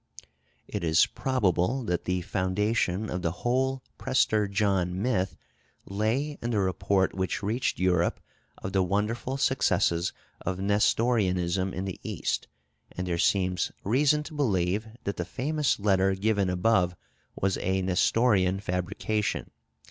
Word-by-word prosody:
It - - -4
is 80 0 +5
probable 125 -1 0
that 90 -5 -2
the 90 0 0
foundation 100 +2 0
of 90 -2 -3
the 85 0 -3
whole 130 +1 +1 0.2
Prester 110 -5 +2
John 95 -3 0
myth 100 -4 0 0.5
lay 115 +9 -1
in 120 - -2
the 110 -3 +1
report 95 0 +1
which 95 +2 -2
reached 115 +6 0
Europe 90 -2 +1 0.4
of 95 - -6
the 95 - +3
wonderful 105 +8 -1
successes 95 -10 +2 0.3
of 90 0 -2
Nestorianism 95 -3 +1
in 95 +1 -4
the 95 - -5
East, - - -2 0.4
and 90 - -4
there 85 -1 -1
seems 90 -2 +1
reason 145 +7 +3
to 155 - -10
believe 105 - 0 0.2
that 100 - -3
the 90 - -1
famous 145 - 0
letter 95 -1 +2
given 100 -1 +1
above 90 -1 +2 0.4
was 95 0 0
a 95 +1 0
Nestorian 95 0 +2
fabrication. 100 +3 -2
100 Hz, 135 wpm, -28 LUFS, 90-115 Hz, 0.5 s, is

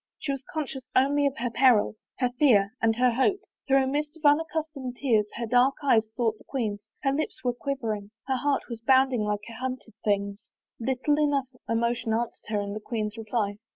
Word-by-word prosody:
She 280 - -3
was 275 -1 -4
conscious 270 -4 -4
only 285 +2 +4
of 275 - -3
her 240 0 -2
peril, 245 -4 +4 0.2
her 250 -2 +1
fear, 215 -8 +5
and 225 0 +3
her 250 +1 +3
hope. 270 - +2 0.3
Through 270 -1 +4
a - - 0
mist 295 +4 -2
of 315 - -10
unaccustomed 300 -3 +1
tears 225 -6 +2
her 235 - -3
dark 250 +4 +4
eyes 225 -6 +3
sought 225 -3 0
the - - -17
queen's; 215 -6 -3 0.2
her 275 - +3
lips 310 +3 -3
were 245 -1 +1
quivering, 230 -6 -3 0.2
her 265 -1 0
heart 285 +2 +1
was 235 -2 -7
bounding 260 -1 +4
like 210 -1 -1
a 230 - -9
hunted 255 -1 -5
thing's. 200 -1 0 0.4
Little 265 +5 +1
enough 280 -3 +1 0.2
emotion 230 0 0
answered 235 +1 -3
her 210 -1 +1
in 200 0 -4
the 215 - -4
queen's 215 -1 -3
reply. 215 -2 -2
250 Hz, 195 wpm, -27 LUFS, 220-275 Hz, 0.4 s, fear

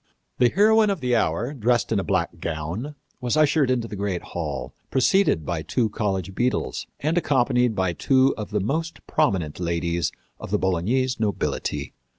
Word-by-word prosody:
The 125 - +5
heroine 215 - +4
of 195 -3 -1
the 125 -3 +1
hour, 110 - 0
dressed 120 -3 +1
in 110 - +2
a - - -1
black 85 -3 -1
gown, 85 - -4 0.2
was 125 +3 -1
ushered 150 -2 +3
into 120 -3 0
the 105 - -7
great 100 -3 -2
hall, 70 -7 -4 0.2
preceded 130 - +3
by 85 -1 -2
two 110 - 0
college 95 -3 -2
beadles 125 +5 -1
and 160 +4 +2
accompanied 125 -6 +2
by 95 -2 0
two 130 +7 +3
of 105 - -6
the 105 -1 0
most 160 - -3
prominent 90 - 0
ladies 85 0 -1 0.3
of - - -7
the - - +2
Bolognese 115 +8 0
nobility. 75 - -2
110 Hz, 165 wpm, -24 LUFS, 85-130 Hz, 0.3 s, The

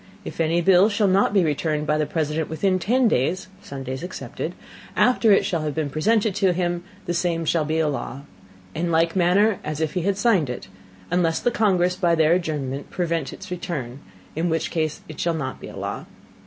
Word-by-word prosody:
If - - -4
any 165 +2 +2
Bill 190 +3 +5
shall 205 -1 +2
not 195 +1 +3
be 200 -3 +3
returned 150 0 0
by 150 0 +1
the 150 - 0
President 155 -1 -1
within 185 +4 +1
ten 245 +6 +2
Days 185 - 0
(Sundays 135 -1 -6
excepted) 180 +2 -6 0.4
after 245 -3 +4
it 195 - +5
shall 170 -3 -1
have 150 -2 -3
been 155 -3 -2
presented 210 +7 +2
to 190 -2 +2
him, 175 -1 -1 0.2
the 175 - -1
Same 170 -1 0
shall 160 -1 +1
be 155 +1 -1
a 160 -1 +2
Law, 140 -2 -4 0.5
in 170 +2 -1
like 165 +1 +2
Manner 190 +3 +3
as 155 0 -4
if 160 -1 -1
he 180 - -1
had 195 +2 0
signed 195 - +2
it, 125 -5 -6 0.4
unless 170 -2 +2
the 245 - +1
Congress 180 -5 +2
by 175 -3 +2
their 160 0 +4
Adjournment 145 -6 -2
prevent 165 -5 -2
its - - -10
Return, 140 -8 -4 0.4
in 165 +3 0
which 160 0 -1
case 155 -3 -1
it 155 - -10
shall 170 -1 0
not 140 -5 -4
be - - -7
a - - -10
Law. - - -5
170 Hz, 205 wpm, -23 LUFS, 155-185 Hz, 0.5 s, Bill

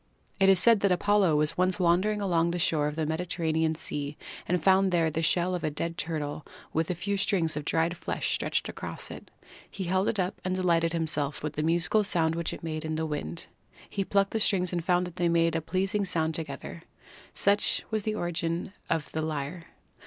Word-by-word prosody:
It 195 0 +5
is 190 - +7
said 230 0 +5
that 200 -1 +2
Apollo 195 -2 +3
was 150 +3 +1
once 185 +2 +2
wandering 185 +4 +2
along 170 -4 +2
the 175 - -2
shore 155 -3 +1
of 150 - -4
the 160 -1 -1
Mediterranean 160 -1 0
Sea 145 -2 -5 0.3
and 175 -2 0
found 190 +1 +4
there 165 -2 +2
the 160 - -1
shell 175 +2 +1
of 180 - -3
a - - +1
dead 165 +3 -3
turtle 150 -3 -3 0.3
with 160 0 0
a 180 - 0
few 200 +4 -2
strings 175 -5 +1
of 150 -1 -4
dried 165 +2 +1
flesh - - -2
stretched - - -1
across - - -5
it. - - -10 0.4
He 195 - -5
held 185 +2 +1
it 215 - 0
up 185 +2 -2
and 185 0 -1
delighted 170 -2 +2
himself 155 -4 -1
with 150 -1 -3
the 150 - -2
musical 170 +6 +2
sound 165 -5 +1
which 170 0 -1
it - - -8
made 155 -1 -3
in 155 0 -2
the 160 0 -1
wind. 115 - -4 0.4
He 195 - -2
plucked 195 0 +1
the 225 - 0
strings 185 -4 +2
and 175 -1 -1
found 180 +1 +2
they 175 0 -1
made 165 -1 +2
a 165 - 0
pleasing 195 +5 0
sound 160 -4 0
together. 165 +1 -6 0.5
Such 200 +1 +3
was 220 -1 0
the 215 +1 -2
origin 175 0 -2 0.2
of 160 -2 -1
the 160 - -2
lyre. 155 +2 -4
170 Hz, 210 wpm, -28 LUFS, 160-185 Hz, 0.5 s, is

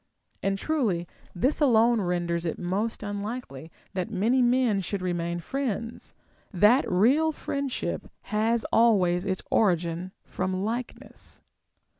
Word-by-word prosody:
And 195 0 0
truly, 205 - -1 0.3
this 260 - +1
alone 235 -4 +4
renders 175 -2 -1
it 165 - -3
most 200 +6 -2
unlikely 205 - -5 0.2
that 185 +2 -2
many 225 +5 +2
men 245 -4 +3
should 190 +1 -4
remain 175 -1 -2
friends, 230 +1 -4 0.4
that 210 +7 +4
real 265 - +4
friendship 280 -3 -4
has 225 +1 0
always 190 -5 +3
its 190 -1 -2
origin 175 -2 +1
from 185 +1 -3
like 235 +3 -3
ness. - - -13
205 Hz, 120 wpm, -27 LUFS, 180-240 Hz, 0.4 s, alone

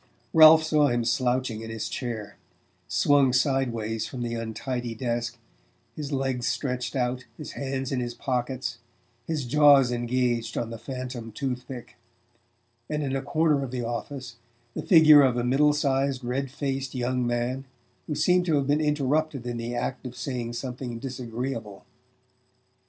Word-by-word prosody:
Ralph 160 0 +9
saw 155 -2 +3
him 120 -2 0
slouching 125 -1 0
in 115 - -7
his 110 -1 -4
chair, 115 -5 -5 0.5
swung 140 -3 +3
sideways 120 -5 0
from 125 -2 -5
the 120 -1 -3
untidy 115 +1 -4
desk, 120 0 -2 0.6
his 150 -1 -5
legs 130 -3 -1
stretched 125 -2 -2
out, 125 0 -1
his 150 - -7
hands 135 -1 -3
in 130 - 0
his 120 -1 -3
pockets, 130 0 -2 0.5
his 155 -5 -2
jaws 140 -1 +6
engaged 120 -1 -1
on 115 -1 -2
the 115 - -7
phantom 125 -2 -6
tooth 125 0 -4
pick; 125 -3 -9 0.9
and, 150 -1 -1
in 135 -1 -1
a 135 - -1
corner 155 0 +1
of 135 - -4
the 125 -1 -3
office, 125 +1 -5 0.4
the - - -4
figure 155 -4 +8
of 130 -3 +3
a 120 - 0
middle 140 +4 +4
sized 135 -2 0
red 130 +3 -2
faced 135 -1 -3
young 125 0 0
man 120 +3 -1 0.4
who 150 - -2
seemed 180 +4 +3
to 160 - +3
have 140 -1 +1
been 145 +2 +2
interrupted 150 -2 0
in 120 -1 -3
the 120 +1 -4
act 130 +2 -3
of 125 0 -10
saying 125 -2 -4
something 125 -1 -5
disagreeable. 120 -4 -5
130 Hz, 155 wpm, -26 LUFS, 120-140 Hz, 0.9 s, Ralph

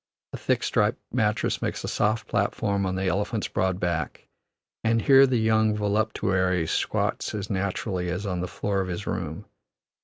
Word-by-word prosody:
A - - -3
thick, - - 0
striped 105 +2 +2 0.2
mattress 110 -3 +1
makes - - -2
a - - -3
soft 110 +2 0
platform 100 -1 0
on 95 - -1
the 95 +1 -1
elephant's 100 +4 0
broad 95 -1 0
back, 85 -5 -2 0.6
and 115 0 +2
here 135 0 +7
the 130 -1 +1
young 110 -1 +3
voluptuary 100 -4 +1
squats - - -1
as 100 -1 -4
naturally 95 -1 -2
as 90 +4 -3
on 90 -2 -2
the 90 - -2
floor 100 +1 -1
of 95 - -3
his 90 +3 -4
room. 85 +4 -4
100 Hz, 165 wpm, -26 LUFS, 90-110 Hz, 0.6 s, here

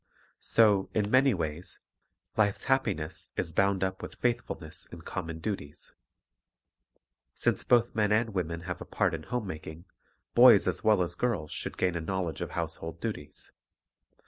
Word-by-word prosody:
So, 105 -4 +4
in 105 -1 +1
many 130 -2 +5
ways, 80 0 -4 0.6
life's 105 -2 +1
happi 130 -7 +2
ness 75 -1 -7
is 80 - -1
bound 100 +1 +2
up 95 0 -2
with - - -8
faithfulness 115 -8 -3
in 85 - -9
common 85 -3 -5
duties. 80 -5 -5 1.4
Since - - 0
both 120 -1 +3
men 105 -1 +1
and 110 +1 +2
women 85 -3 -2
have 90 +1 -5
a - - -6
part - - 0
in 80 - -3
home 125 +6 -3
making, 80 -1 -8 0.5
boys - - +8
as - - 0
well 105 -4 +4
as 85 0 -2
girls 95 -12 -1
should - - -5
gain 90 -1 +1
a 85 - -2
knowledge 90 -1 -3
of - - -3
household 80 0 -4
duties. 105 -10 -6
95 Hz, 160 wpm, -29 LUFS, 80-110 Hz, 1.4 s, boys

